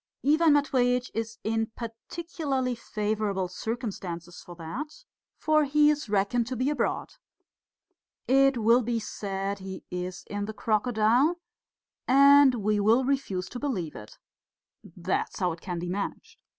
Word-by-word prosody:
Ivan 310 +2 +5
Matveitch 250 -4 +2
is 225 0 -4
in 225 0 0
particularly 260 +2 -3
favourable 210 -4 -2
circumstances 185 -4 -5
for 175 - -11
that, 280 - -7 0.3
for 305 0 +3
he 295 +1 +4
is 295 -6 -3
reckoned 210 +4 +1
to 255 - -3
be 255 +4 0
abroad. 295 - -2 1.1
It 270 0 +4
will 230 +2 +4
be 235 0 -1
said 200 -2 -4
he 190 0 -8
is 180 0 -5
in 205 0 -4
the 220 - -6
crocodile, 230 +8 +2 0.7
and 280 0 +7
we 210 -1 0
will 225 +5 +3
refuse 225 -10 -1
to 245 - -7
believe 195 - -3
it. 105 0 -11 0.8
That 180 +1 -2
is - - -7
how 180 -2 +1
it 165 0 -8
can 180 -2 -4
be 175 +1 -4
managed. 200 +1 -5
225 Hz, 140 wpm, -27 LUFS, 195-270 Hz, 1.1 s, and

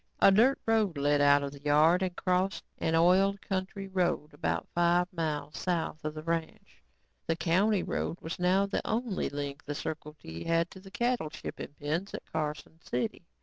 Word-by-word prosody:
A - - +7
dirt 235 +8 +5
road 215 -7 +2
led 145 +1 +2
out 145 0 +5
of 140 - -3
the 140 0 -12
yard 155 +5 +4
and 185 -2 -1
crossed 185 +2 0 0.2
an 160 - +1
oiled 190 +4 +4
county 195 +1 -3
road 180 -5 0
about - - -2
five 175 +1 +3
miles 155 -3 -3
south 165 -3 -2
of 155 0 -3
the 155 - -6
ranch. 165 -1 -4 0.5
The 165 - +2
county 190 +5 +2
road 170 - -2
was 165 +2 -6
now 185 +2 +3
the 200 - -1
only 225 -2 -1
link 145 0 -5
the 145 - -4
Circle 155 0 -5
T 80 +1 -8
had 165 +1 +1
to 190 - -11
the 195 +1 -13
cattle 240 -5 0
shipping 145 - -7
pens 160 +7 -2
at - - -7
Carson 155 +1 -4
City. 215 -5 -3
170 Hz, 185 wpm, -30 LUFS, 150-190 Hz, 0.5 s, A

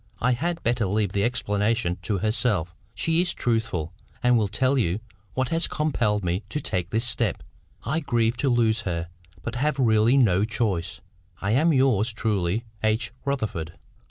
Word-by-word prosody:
I 125 - +2
had 165 +7 -1
better 120 -3 +1
leave 100 0 0
the 100 0 0
explanation 105 -4 0
to 100 +3 -1
herself; 105 -5 0 0.2
she 165 +1 +1
is 180 -1 +1
truthful, 110 -9 -1 0.3
and 125 0 +5
will 110 -3 +2
tell 130 +7 +1
you 100 -7 +1 0.4
what 130 -1 0
has 165 +1 +1
compelled 120 -9 0
me 90 +3 0
to 150 - -2
take 90 - -1
this 110 +4 0
step. 115 -4 0 0.4
I 145 +8 0
grieve 120 -5 +1
to 140 - +1
lose 115 -2 +2
her, 85 -4 -3 0.3
but 120 - -4
have 140 +3 0
really 115 0 +4
no 100 -7 +4
choice. 105 -6 -2 0.4
I 95 - -1
am, 155 +8 +4
yours 130 -6 +3
truly, 110 -1 -1 0.2
H. 110 +2 +1
RUTHERFORD." 110 - -2
115 Hz, 165 wpm, -25 LUFS, 100-125 Hz, 0.4 s, and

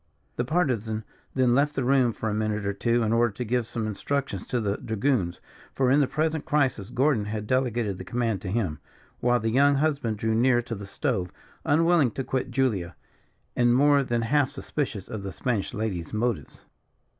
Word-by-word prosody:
The 120 - -1
Partisan 120 - 0 0.3
then 130 -2 +3
left 145 +3 +2
the 135 - 0
room 130 -1 +3
for 110 - -4
a 105 - 0
minute 105 -1 -1
or 100 - 0
two, 120 +3 +1
in 110 0 +1
order 115 0 +3
to 125 - -4
give 120 0 0
some 115 -2 -3
instructions 110 0 -3
to 125 - 0
the 105 -2 -1
dragoons; 110 -5 -1 0.4
for, 130 -1 +2
in 140 - +5
the 140 - +3
present 155 +1 -1
crisis 130 -9 0
Gordon 125 -3 +2
had 105 0 -4
delegated 120 -5 0
the - - -5
command 115 -5 -1
to 95 - -6
him; 95 -8 -1 0.4
while 120 0 +2
the 115 0 -1
young 140 +3 +4
husband 140 -7 0
drew 110 +1 0
near 120 +1 +3
to 120 - -5
the 100 -2 -7
stove, 90 -2 -2 0.3
unwilling 165 -2 +4
to 135 - -3
quit 130 0 -2
Julia, 115 -9 0 0.6
and 120 0 +4
more 145 +1 +5
than 120 -2 -1
half 135 +3 +2
suspicious 135 -7 -4
of 110 - -5
the 100 0 -5
Spanish 115 0 -2
lady's 105 -6 -3
motives. 115 +1 -2
120 Hz, 190 wpm, -26 LUFS, 110-135 Hz, 0.6 s, in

